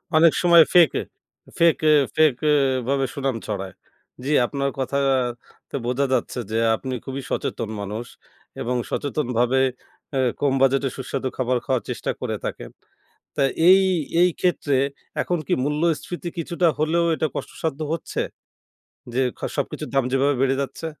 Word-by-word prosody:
অনেক 160 Hz, 0 st, +6 dB
সময় 170 Hz, -2 st, +8 dB
fake 175 Hz, -3 st, +8 dB, 0.7 s
fake 170 Hz, -1 st, +5 dB, 0.4 s
fake 155 Hz, -3 st, +5 dB, 0.5 s
ভাবে 135 Hz, 0 st, +1 dB
সুনাম 135 Hz, -3 st, -1 dB
ছড়ায়। 95 Hz, -3 st, -4 dB, 0.5 s
জি 145 Hz, -, -2 dB
আপনার 140 Hz, +1 st, -1 dB
কথাতে 130 Hz, -3 st, -2 dB
বোঝা 125 Hz, +3 st, +1 dB
যাচ্ছে 130 Hz, -, -1 dB
যে 110 Hz, -, 0 dB, 0.2 s
আপনি 130 Hz, +3 st, -5 dB
খুবই 135 Hz, 0 st, -4 dB
সচেতন 110 Hz, -, -2 dB
মানুষ 105 Hz, +4 st, -5 dB, 0.6 s
এবং 125 Hz, +2 st, -1 dB
সচেতনভাবে 130 Hz, -3 st, 0 dB, 0.6 s
এ -, -, +1 dB, 0.2 s
কম 140 Hz, -2 st, +2 dB
বাজেটে 135 Hz, 0 st, +3 dB
সুস্বাদু 130 Hz, 0 st, -3 dB
খাবার 130 Hz, -1 st, +1 dB
খাওয়ার 130 Hz, -3 st, 0 dB
চেষ্টা -, -, -2 dB
করে -, -, -2 dB
থাকেন। -, -, -5 dB, 0.7 s
তা 140 Hz, -, +2 dB, 0.3 s
এই 190 Hz, +1 st, +8 dB, 0.4 s
এই 180 Hz, -, +6 dB
ক্ষেত্রে 165 Hz, -6 st, +1 dB, 0.5 s
এখন 175 Hz, -, -1 dB
কি -, -, +1 dB
মূল্যস্ফীতি 165 Hz, +4 st, -1 dB
কিছুটা 170 Hz, +1 st, 0 dB
হলেও 165 Hz, +2 st, +2 dB
এটা 155 Hz, -, 0 dB
কষ্টসাধ্য 160 Hz, -2 st, -4 dB
হচ্ছে 165 Hz, -, -3 dB, 0.9 s
যে 130 Hz, -, +2 dB, 0.2 s
খ -, -, -19 dB, 0.2 s
সবকিছুর -, -, -3 dB
দাম 135 Hz, -2 st, +3 dB
যেভাবে 140 Hz, +2 st, +3 dB
বেড়ে 135 Hz, 0 st, +2 dB
যাচ্ছে? 140 Hz, +4 st, -6 dB
135 Hz, 135 wpm, -23 LUFS, 130-155 Hz, 0.9 s, সময়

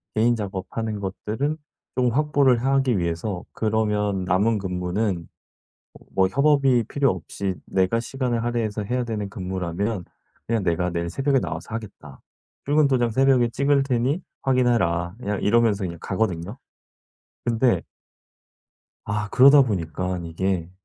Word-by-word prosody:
개인 115 Hz, +2 st, +3 dB
작업하는 105 Hz, +1 st, -4 dB
것들을 110 Hz, +9 st, -3 dB, 0.4 s
조금 125 Hz, -1 st, +2 dB
확보를 140 Hz, -3 st, +3 dB
하기 135 Hz, -3 st, +2 dB
위해서 85 Hz, +3 st, -2 dB
그러면 105 Hz, -3 st, 0 dB
남은 100 Hz, +5 st, +2 dB
근무는 90 Hz, 0 st, -2 dB, 0.9 s
뭐 95 Hz, -1 st, +3 dB
협업이 135 Hz, +1 st, +3 dB
필요 140 Hz, -2 st, +2 dB
없이 95 Hz, -2 st, -4 dB
내가 95 Hz, +4 st, +1 dB
시간을 120 Hz, -1 st, -2 dB
할애해서 115 Hz, -3 st, -1 dB
해야 125 Hz, +5 st, -1 dB
되는 105 Hz, -3 st, -3 dB
근무라면 95 Hz, +1 st, -3 dB, 0.4 s
그냥 115 Hz, -3 st, 0 dB
"내가 90 Hz, 0 st, 0 dB
내일 85 Hz, 0 st, -2 dB
새벽에 135 Hz, +8 st, +1 dB
나와서 115 Hz, -, -5 dB
하겠다. 100 Hz, -, -9 dB, 0.4 s
출근 145 Hz, +1 st, +4 dB
도장 125 Hz, -3 st, +2 dB
새벽에 130 Hz, 0 st, +3 dB
찍을 140 Hz, +3 st, +2 dB
테니 135 Hz, +5 st, 0 dB, 0.2 s
확인해라." 115 Hz, -10 st, +1 dB
그냥 105 Hz, -4 st, -3 dB
이러면서 110 Hz, -2 st, +3 dB
그냥 85 Hz, -1 st, -5 dB
가거든요. 95 Hz, 0 st, -2 dB, 0.9 s
근데 120 Hz, +1 st, +2 dB, 1.2 s
아 105 Hz, +1 st, -2 dB
그러다 140 Hz, +5 st, +7 dB
보니깐 90 Hz, -, -3 dB
이게 85 Hz, +1 st, -2 dB
110 Hz, 300 characters per minute, -24 LUFS, 95-125 Hz, 1.2 s, 그러다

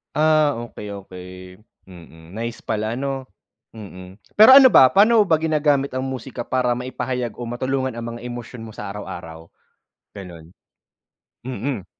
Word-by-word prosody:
Ah, 155 Hz, -1 st, +3 dB
okey, 105 Hz, -, -10 dB, 0.2 s
okey. 90 Hz, -1 st, -11 dB, 0.6 s
Mm, 85 Hz, -2 st, -15 dB
nice 115 Hz, 0 st, -5 dB
pala 110 Hz, +1 st, -2 dB
'no? 135 Hz, 0 st, -4 dB, 0.5 s
Mm, 95 Hz, -3 st, -11 dB, 0.2 s
pero 240 Hz, +5 st, +10 dB
ano 265 Hz, -2 st, +8 dB
ba, 130 Hz, -, +8 dB
pano 215 Hz, +3 st, +5 dB
mo -, -, -8 dB
ba 160 Hz, -, +4 dB
ginagamit 150 Hz, -3 st, +1 dB
ang 130 Hz, 0 st, -3 dB
musika 130 Hz, -2 st, -7 dB
para 125 Hz, -1 st, 0 dB
maipahayag 125 Hz, -2 st, -4 dB
o 120 Hz, -, -7 dB
matulungan 130 Hz, +2 st, -3 dB
ang 115 Hz, 0 st, -6 dB
mga 120 Hz, -, -11 dB
emosyon 120 Hz, -1 st, -8 dB
mo 110 Hz, -, -10 dB
sa 105 Hz, -, -8 dB
araw-araw? 80 Hz, -5 st, -9 dB, 0.7 s
Ganon. 85 Hz, -4 st, -11 dB, 1.0 s
Mm. 125 Hz, -4 st, -4 dB
120 Hz, 145 wpm, -21 LUFS, 105-135 Hz, 1.0 s, pero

